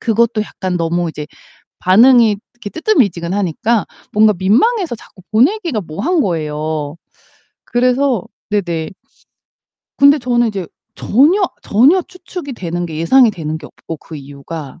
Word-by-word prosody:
그것도 230 Hz, -1 st, +1 dB
약간 185 Hz, -3 st, -4 dB
너무 170 Hz, +1 st, -1 dB
이제 150 Hz, -1 st, -7 dB, 0.5 s
반응이 225 Hz, +3 st, +5 dB, 0.2 s
이렇게 240 Hz, -4 st, -8 dB
뜨뜨미지근 200 Hz, -, +1 dB
하니까 205 Hz, +4 st, 0 dB, 0.3 s
뭔가 215 Hz, 0 st, +5 dB
민망해서 290 Hz, -, +2 dB
자꾸 190 Hz, -, -17 dB
보내기가 295 Hz, -, +2 dB
뭐한 295 Hz, -, -1 dB
거예요. 155 Hz, -3 st, -3 dB, 0.7 s
그래서 250 Hz, -2 st, +1 dB, 0.3 s
네네. 175 Hz, -6 st, -2 dB, 1.1 s
근데 280 Hz, +1 st, +6 dB
저는 240 Hz, -1 st, +1 dB
이제 195 Hz, -4 st, -4 dB, 0.3 s
전혀 310 Hz, -, +3 dB, 0.2 s
전혀 270 Hz, -, +4 dB
추측이 355 Hz, -5 st, -8 dB
되는 175 Hz, -5 st, -4 dB
게 160 Hz, -2 st, -7 dB
예상이 235 Hz, +9 st, +4 dB
되는 160 Hz, -5 st, -5 dB
게 155 Hz, -, -11 dB
없고 165 Hz, -, -9 dB
그 160 Hz, -, -10 dB
이유가 140 Hz, +2 st, -9 dB
210 Hz, 295 characters per minute, -16 LUFS, 165-255 Hz, 1.1 s, 근데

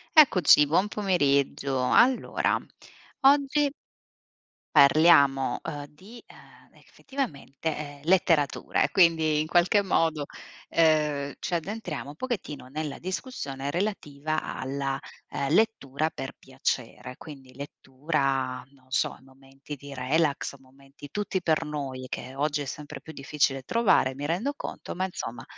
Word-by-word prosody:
Eccoci, 185 Hz, -, +7 dB
buon 175 Hz, +7 st, +2 dB
pomeriggio. 140 Hz, -9 st, +1 dB
Allora, 255 Hz, +1 st, +3 dB, 0.6 s
oggi 285 Hz, +1 st, +4 dB, 1.1 s
parliamo, 140 Hz, -2 st, +5 dB
uhm, 145 Hz, -3 st, -5 dB
di 195 Hz, +11 st, -15 dB
ehm, -, -, -18 dB
effettivamente 155 Hz, -, -5 dB
letteratura 165 Hz, -4 st, +2 dB
e -, -, 0 dB
quindi 160 Hz, -4 st, +4 dB
in 155 Hz, -, -1 dB
qualche 175 Hz, +5 st, +4 dB
modo, 165 Hz, -6 st, +1 dB, 0.4 s
ehm, 150 Hz, -3 st, +2 dB
ci 175 Hz, -, -2 dB
addentriamo 175 Hz, -5 st, -4 dB
un 145 Hz, -, -10 dB
pochettino 175 Hz, -, -5 dB
nella 150 Hz, +1 st, -5 dB
discussione 145 Hz, -, -4 dB
relativa 155 Hz, -5 st, -2 dB
alla, 135 Hz, 0 st, -3 dB, 0.3 s
ehm, 140 Hz, -, -2 dB
lettura 160 Hz, -9 st, +1 dB
per 135 Hz, -, -6 dB
piacere. 130 Hz, -1 st, -4 dB
Quindi 135 Hz, -4 st, -12 dB
lettura, 135 Hz, -2 st, -2 dB
non 130 Hz, -1 st, -25 dB
so, -, -, 0 dB
momenti 135 Hz, +2 st, -11 dB
di 140 Hz, +1 st, -12 dB
relax, 140 Hz, +3 st, 0 dB
momenti 135 Hz, +2 st, -15 dB
tutti 200 Hz, +2 st, -2 dB
per 160 Hz, -1 st, +1 dB
noi 140 Hz, -4 st, -5 dB
che 130 Hz, +1 st, -6 dB
oggi 145 Hz, +1 st, 0 dB
è -, -, -4 dB
sempre 145 Hz, +1 st, -7 dB
più 160 Hz, -, -10 dB
difficile 140 Hz, -2 st, -1 dB
trovare, 205 Hz, -, +3 dB
mi 140 Hz, +2 st, -5 dB
rendo 200 Hz, -, -1 dB
conto, -, -, -7 dB
ma 185 Hz, +1 st, -1 dB
insomma, 120 Hz, -10 st, -6 dB
150 Hz, 120 wpm, -27 LUFS, 135-175 Hz, 1.1 s, Eccoci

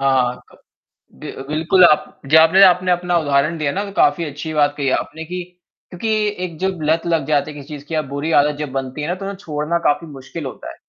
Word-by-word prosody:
हाँ, 130 Hz, -2 st, +1 dB
क -, -, -18 dB, 0.6 s
दे -, -, -7 dB
अ, -, -, -9 dB
बिल्कुल 160 Hz, +5 st, +3 dB
आप 150 Hz, -3 st, +2 dB
जी 155 Hz, -, +4 dB
आपने 165 Hz, +5 st, +6 dB
आपने 180 Hz, -1 st, +5 dB
अपना 175 Hz, 0 st, +1 dB
उदाहरण 150 Hz, +1 st, +1 dB
दिया 150 Hz, -3 st, -1 dB
ना 200 Hz, +5 st, -2 dB
तो 200 Hz, -, -8 dB
काफ़ी 145 Hz, +4 st, +3 dB
अच्छी 150 Hz, +2 st, -6 dB
बात 145 Hz, -1 st, +2 dB
कही 140 Hz, -2 st, 0 dB
आपने 160 Hz, +4 st, -3 dB
कि, 180 Hz, +2 st, -5 dB, 0.5 s
क्योंकि 195 Hz, +5 st, -4 dB, 0.3 s
एक 170 Hz, -3 st, -6 dB
जब 190 Hz, -2 st, -2 dB
लत 165 Hz, +1 st, +1 dB
लग 165 Hz, -4 st, +1 dB
जाती 150 Hz, +1 st, 0 dB
है -, -, -12 dB
किसी 140 Hz, -1 st, -10 dB
चीज़ 145 Hz, -2 st, -8 dB
की 165 Hz, -, -7 dB
या 155 Hz, -, +2 dB
बुरी 145 Hz, +3 st, -2 dB
आदत 150 Hz, 0 st, +2 dB
जब 150 Hz, -3 st, -4 dB
बनती 135 Hz, +2 st, -4 dB
है 150 Hz, -, -3 dB
ना 175 Hz, -, -1 dB
तो 195 Hz, -, -7 dB
उन्हें 200 Hz, 0 st, -5 dB
छोड़ना 160 Hz, -3 st, -2 dB
काफ़ी 155 Hz, +3 st, +1 dB
मुश्किल 140 Hz, +2 st, -8 dB
होता 130 Hz, -, -7 dB
है। -, -, -13 dB
155 Hz, 245 wpm, -19 LUFS, 145-175 Hz, 0.6 s, आपने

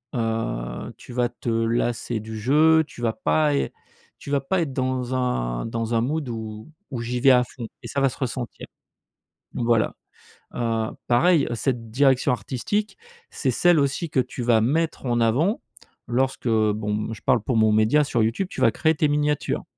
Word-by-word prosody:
heu, 110 Hz, -, -3 dB
tu -, -, -13 dB
vas 120 Hz, 0 st, +1 dB
te 120 Hz, 0 st, -6 dB
lasser 115 Hz, 0 st, 0 dB
du 110 Hz, 0 st, -7 dB
jeu, 155 Hz, +7 st, +4 dB
tu 130 Hz, -, -12 dB
vas 115 Hz, -2 st, +1 dB
pas 150 Hz, -2 st, +1 dB
ê -, -, -1 dB, 0.5 s
tu 140 Hz, -, -8 dB
vas 140 Hz, -, +3 dB
pas 180 Hz, +7 st, 0 dB
être 140 Hz, -5 st, -3 dB
dans 130 Hz, -1 st, -1 dB
un -, -, -1 dB
dans 115 Hz, 0 st, -3 dB
un 115 Hz, -, +3 dB
mood 145 Hz, +3 st, -1 dB
où 110 Hz, +3 st, -7 dB, 0.2 s
où 125 Hz, -4 st, -4 dB
j'y 120 Hz, +1 st, -2 dB
vais 135 Hz, +2 st, +5 dB
à 125 Hz, -1 st, +5 dB
fond 120 Hz, -1 st, -8 dB, 0.2 s
et -, -, -6 dB
ça 140 Hz, -, -2 dB
va 135 Hz, -, +4 dB
se -, -, -11 dB
ressentir. 125 Hz, -2 st, -4 dB, 0.9 s
Voilà. 115 Hz, -2 st, +1 dB, 0.6 s
Heu, 115 Hz, -2 st, -1 dB, 0.2 s
pareil 140 Hz, +6 st, +4 dB
cette 115 Hz, -2 st, -2 dB
direction 135 Hz, +1 st, +3 dB
artistique, 205 Hz, -, -2 dB, 0.3 s
c'est -, -, -1 dB
celle 175 Hz, -2 st, +4 dB
aussi 140 Hz, +4 st, 0 dB
que 140 Hz, -, 0 dB
tu 125 Hz, 0 st, -3 dB
vas 115 Hz, -2 st, +4 dB
mettre 150 Hz, +5 st, 0 dB
en 120 Hz, -1 st, +1 dB
avant 145 Hz, -, +2 dB, 0.5 s
lorsque, 130 Hz, +1 st, -1 dB
bon, 105 Hz, -2 st, +1 dB
mmh, 110 Hz, +1 st, -3 dB
je -, -, -10 dB
parle 125 Hz, -4 st, +2 dB
pour 125 Hz, +2 st, -2 dB
mon 110 Hz, -1 st, +4 dB
média 110 Hz, +8 st, +4 dB
sur 120 Hz, -6 st, +1 dB
YouTube, 115 Hz, -, 0 dB
tu -, -, -7 dB
vas -, -, +5 dB
créer 160 Hz, 0 st, +1 dB
tes 150 Hz, -, +2 dB
miniatures. 150 Hz, 0 st, 0 dB
125 Hz, 185 wpm, -24 LUFS, 115-140 Hz, 0.9 s, vais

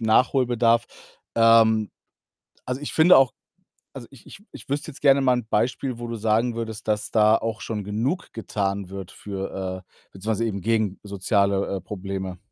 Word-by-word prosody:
Nachholbedarf. 120 Hz, 0 st, +3 dB, 0.5 s
Ähm, 115 Hz, -2 st, +5 dB, 0.7 s
also, 125 Hz, +2 st, -4 dB
ich 145 Hz, -, -5 dB
finde 165 Hz, +3 st, +6 dB
auch 135 Hz, -2 st, +5 dB, 0.6 s
also, 125 Hz, -4 st, -9 dB
ich 135 Hz, -5 st, -17 dB
ich -, -, -12 dB
ich -, -, -12 dB
wüsste 145 Hz, +2 st, -2 dB
jetzt 140 Hz, -, -13 dB
gerne 140 Hz, -1 st, +5 dB
mal 130 Hz, -1 st, +4 dB
'n 125 Hz, -3 st, -3 dB
Beispiel, 125 Hz, +3 st, -1 dB
wo 120 Hz, 0 st, -6 dB
du 115 Hz, -, -4 dB
sagen 115 Hz, +2 st, +1 dB
würdest, 110 Hz, -2 st, -6 dB
dass 105 Hz, -1 st, -1 dB
da 110 Hz, 0 st, +5 dB
auch 115 Hz, -1 st, -4 dB
schon 105 Hz, -2 st, -4 dB
genug 115 Hz, -, -2 dB
getan 100 Hz, -4 st, -3 dB
wird 95 Hz, -1 st, -7 dB
für 95 Hz, -2 st, -5 dB
äh, -, -, -41 dB, 0.2 s
beziehungsweise 110 Hz, +4 st, -2 dB
eben 100 Hz, -3 st, -3 dB
gegen 110 Hz, -2 st, 0 dB
soziale, 100 Hz, 0 st, 0 dB
äh, 95 Hz, -, -8 dB
Probleme? 95 Hz, -2 st, -5 dB
110 Hz, 170 wpm, -24 LUFS, 100-120 Hz, 0.7 s, finde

